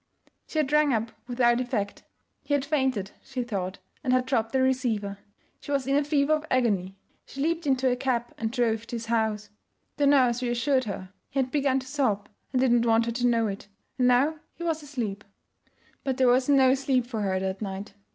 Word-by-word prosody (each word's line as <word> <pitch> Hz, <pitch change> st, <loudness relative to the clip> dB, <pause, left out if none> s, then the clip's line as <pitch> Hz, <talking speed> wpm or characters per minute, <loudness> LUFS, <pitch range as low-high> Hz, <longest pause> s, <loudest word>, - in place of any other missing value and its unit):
She -, -, -6 dB
had 295 Hz, -3 st, +1 dB
rung 300 Hz, -2 st, +4 dB
up 225 Hz, +1 st, -2 dB, 0.2 s
without 240 Hz, -1 st, +2 dB
effect. 225 Hz, -5 st, -3 dB, 0.4 s
He 285 Hz, -, +1 dB
had 280 Hz, -1 st, -1 dB
fainted, 265 Hz, -9 st, 0 dB
she 260 Hz, -2 st, -4 dB
thought, 195 Hz, -5 st, -3 dB, 0.3 s
and 255 Hz, -, 0 dB
had 255 Hz, 0 st, +3 dB
dropped 225 Hz, -4 st, 0 dB
the 265 Hz, -, +1 dB
receiver. 225 Hz, -7 st, 0 dB, 0.4 s
She -, -, -13 dB
was 275 Hz, -2 st, +1 dB
in 275 Hz, +1 st, +1 dB
a 290 Hz, -, +3 dB
fever 290 Hz, 0 st, +2 dB
of 310 Hz, 0 st, 0 dB
agony. 200 Hz, -7 st, +1 dB, 0.3 s
She 275 Hz, -, -10 dB
leaped 330 Hz, +2 st, 0 dB
into 265 Hz, -1 st, +2 dB
a 250 Hz, -, +3 dB
cab 250 Hz, -2 st, -1 dB
and 220 Hz, -1 st, -1 dB
drove 230 Hz, -2 st, 0 dB
to 240 Hz, -, -5 dB
his 230 Hz, -1 st, -4 dB
house. 220 Hz, -2 st, -1 dB, 0.5 s
The 290 Hz, -1 st, +3 dB
nurse 255 Hz, -4 st, +4 dB
reassured 250 Hz, +2 st, +1 dB
her; 190 Hz, -2 st, -6 dB, 0.2 s
he -, -, -7 dB
had 260 Hz, -1 st, +1 dB
begun 275 Hz, -3 st, +2 dB
to 260 Hz, -, -12 dB
sob 240 Hz, -8 st, 0 dB, 0.2 s
and 255 Hz, -, +1 dB
did 260 Hz, -1 st, +3 dB
not 240 Hz, 0 st, +3 dB
want 225 Hz, 0 st, +4 dB
her 235 Hz, -, -1 dB
to 245 Hz, +1 st, +1 dB
know 230 Hz, -2 st, +2 dB
it, 200 Hz, -1 st, -5 dB, 0.3 s
and 250 Hz, -, +4 dB
now 275 Hz, +6 st, +3 dB, 0.2 s
he 340 Hz, -, -7 dB
was 325 Hz, -2 st, -1 dB
asleep. 235 Hz, -8 st, -4 dB, 0.8 s
But 265 Hz, -2 st, -1 dB
there 260 Hz, -, +4 dB
was 255 Hz, +2 st, +3 dB
no 265 Hz, -2 st, +6 dB
sleep 265 Hz, -2 st, +1 dB
for 235 Hz, -3 st, -4 dB
her 190 Hz, -2 st, 0 dB
that 190 Hz, +1 st, -3 dB
night. 195 Hz, -1 st, -5 dB
250 Hz, 210 wpm, -27 LUFS, 225-275 Hz, 0.8 s, no